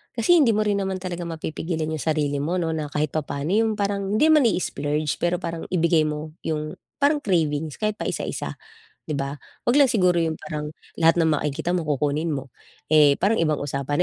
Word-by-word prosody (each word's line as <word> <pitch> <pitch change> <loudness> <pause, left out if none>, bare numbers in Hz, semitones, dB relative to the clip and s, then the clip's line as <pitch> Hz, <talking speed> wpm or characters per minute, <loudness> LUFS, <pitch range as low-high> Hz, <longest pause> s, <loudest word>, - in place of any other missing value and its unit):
kasi 295 +10 +4
hindi 230 -7 +4
mo 215 - +2
rin 205 -1 +1
naman 190 -1 -2
talaga 175 -2 -4
mapipigilan 160 0 -3
'yung 155 - -3
sarili 150 -3 0
mo 165 +6 -1
'no 165 -3 0
na 155 -2 -2
kahit 150 0 -1
papa'no 150 +1 -3
'yung 220 +1 +3
parang, 200 0 -1
hindi 295 - +4
man 300 -6 +6
i-splurge 150 -6 -1
pero 175 +1 +1
parang 165 -1 -5
ibigay 165 -3 +2
mo 150 +1 -4 0.2
'yung 155 +1 -2 0.3
parang 295 +1 +4
cravings 160 - 0
kahit 215 0 0
paisa-isa - - -3 0.5
'di 155 - -2
ba. 140 +1 -3 0.3
Huwag 240 - +4
lang 280 - +7
siguro 180 -5 +3
'yung 160 -1 0
parang 150 0 -5 0.3
lahat 165 +1 +5
ng 160 - +3
makikita 150 +4 -2
mo 175 - 0
kukunin 150 +3 0
mo, 135 -2 -5 0.4
eh, 150 -2 +6
parang 210 +4 +2
ibang 155 -2 +1
usapan 140 0 -2
160 Hz, 190 wpm, -24 LUFS, 150-190 Hz, 0.5 s, lang